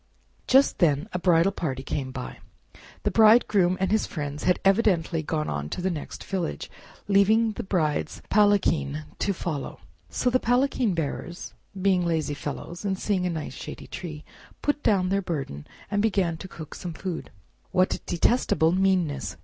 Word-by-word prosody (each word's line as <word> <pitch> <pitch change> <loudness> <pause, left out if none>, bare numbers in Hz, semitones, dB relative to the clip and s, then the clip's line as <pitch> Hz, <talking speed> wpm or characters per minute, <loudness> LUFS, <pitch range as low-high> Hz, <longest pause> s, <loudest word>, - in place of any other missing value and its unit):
Just 270 +2 +4
then 150 -4 +3
a 180 - -1
bridal 175 +1 +4
party 135 -9 -3
came 135 -2 -3
by. 130 -1 -7 0.6
The - - +1
Bridegroom 215 -5 +5
and 190 +1 0
his 215 0 +2
friends 145 -2 -5
had 180 - +4
evidently 190 -5 +3
gone 155 0 -2
on 75 0 -3
to - - -4
the 185 +1 0
next 155 -4 -6
village, 185 -4 -3 0.4
leaving 215 +3 +4
the - - -5
Bride's 155 -5 -1
palanquin 185 - +2 0.2
to 200 - +1
follow; 165 -6 -4 0.3
so 250 - 0
the 255 - +3
palanquin 245 -4 +1
bearers, 165 +2 -4 0.3
being 185 -1 +3
lazy 160 -4 0
fellows 150 +5 -6
and 195 -2 -1
seeing 190 -2 0
a - - -1
nice 160 -3 -4
shady - - -8
tree, 155 -4 -7 0.4
put 290 0 +1
down 185 -3 +2
their 195 +1 +1
burden, 140 - -5 0.2
and 205 -1 +2
began 195 -6 +1
to 190 - -8
cook 160 -4 -9
some 175 -2 -6
food. 180 0 -5 0.4
"What 185 0 +2
detestable 170 -3 +2
meanness!" 170 - +1
180 Hz, 160 wpm, -26 LUFS, 155-200 Hz, 0.6 s, Bridegroom